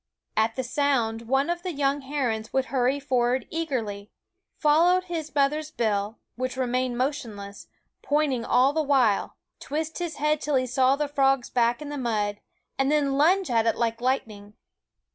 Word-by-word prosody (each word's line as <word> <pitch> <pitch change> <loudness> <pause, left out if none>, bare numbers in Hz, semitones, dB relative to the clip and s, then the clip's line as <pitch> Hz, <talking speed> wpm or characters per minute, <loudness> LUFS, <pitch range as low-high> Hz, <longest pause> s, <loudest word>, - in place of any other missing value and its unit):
At 220 +1 +1
the 260 - -2
sound 240 -4 0
one 270 +3 +2
of 345 0 -2
the 360 -1 -4
young 280 0 0
herons 255 -6 -2
would 265 0 +1
hurry 260 +2 +2
for 255 -4 +1
ward 255 +2 -1
eagerly; 230 -11 -3 0.5
follow 335 +4 +4
his 335 -5 -6
mother's 300 +2 +1
bill, 215 -6 -1 0.2
which 255 +1 -3
remained 255 -1 -1
motionless, 225 -7 -4 0.3
pointing 285 -5 0
all 255 +4 +3
the 320 - +1
while; 260 -8 +2 0.2
twist 315 +3 -4
his 345 -3 -3
head 300 +1 0
till 295 -1 0
he 255 -1 +2
saw 255 +2 +3
the 295 +1 -1
frog's 270 -3 +1
back 240 +3 +1
in 290 - -7
the 290 -1 -4
mud, 210 -4 -1 0.4
and 270 +1 +2
then 285 -2 +2
lunge 345 +3 +3
at 230 -1 +2
it 225 - +2
like 230 0 -1
lightning. 215 -5 -2
265 Hz, 170 wpm, -26 LUFS, 235-295 Hz, 0.5 s, follow